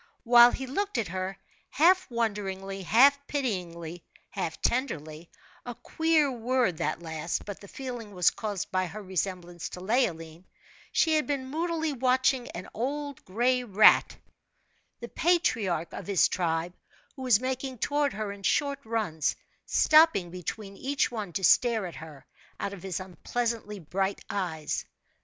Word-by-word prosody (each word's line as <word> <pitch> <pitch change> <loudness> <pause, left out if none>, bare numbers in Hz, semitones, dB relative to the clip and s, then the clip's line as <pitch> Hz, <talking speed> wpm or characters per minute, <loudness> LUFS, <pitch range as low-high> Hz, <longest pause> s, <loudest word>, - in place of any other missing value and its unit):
While 240 0 +8
he 265 - -4
looked 390 +6 -2
at 220 -6 -1
her, 185 +1 -4 0.3
half 365 +4 +4
wonderingly, 195 -4 -3
half 265 +9 +5
pityingly, 175 - -3 0.3
half - - -4
tenderly 165 - -2 0.3
a 245 -1 -6
queer 320 -1 +1
word 245 -6 0
that 155 +3 -2
last, 160 0 -3
but 205 -2 -7
the 200 - -11
feeling 245 -3 -7
was 180 -2 +4
caused 205 -4 -4
by 185 0 0
her 205 +5 -8
resemblance 180 -2 -4
to - - -8
Leoline 180 -6 -1 0.5
she 320 - +3
had 305 - -1
been 265 -2 -3
moodily 320 -1 -1
watching 255 0 +1
an 175 - -7
old 285 +4 -4
gray 245 +6 +1
rat, 215 -2 +5 0.8
the 235 - -5
patriarch 225 - +1
of - - -7
his 200 -4 +4
tribe, 170 -1 -1 0.4
who 265 - -10
was 250 -5 +4
making 260 0 -3
toward 290 +4 0
her 210 0 -4
in 200 0 -10
short 280 +7 +1
runs, 215 - -1 0.3
stopping 310 - +5
between 195 +3 -6
each 275 0 0
one 215 -6 -5
to 190 - -3
stare 225 +2 +4
at 175 - -7
her, 155 -3 -11 0.3
out 200 - -3
of 195 - -9
his 185 -3 -4
unpleasantly 210 +4 -3
bright 190 +3 -3
eyes. 165 -6 -2
215 Hz, 145 wpm, -28 LUFS, 180-260 Hz, 0.8 s, While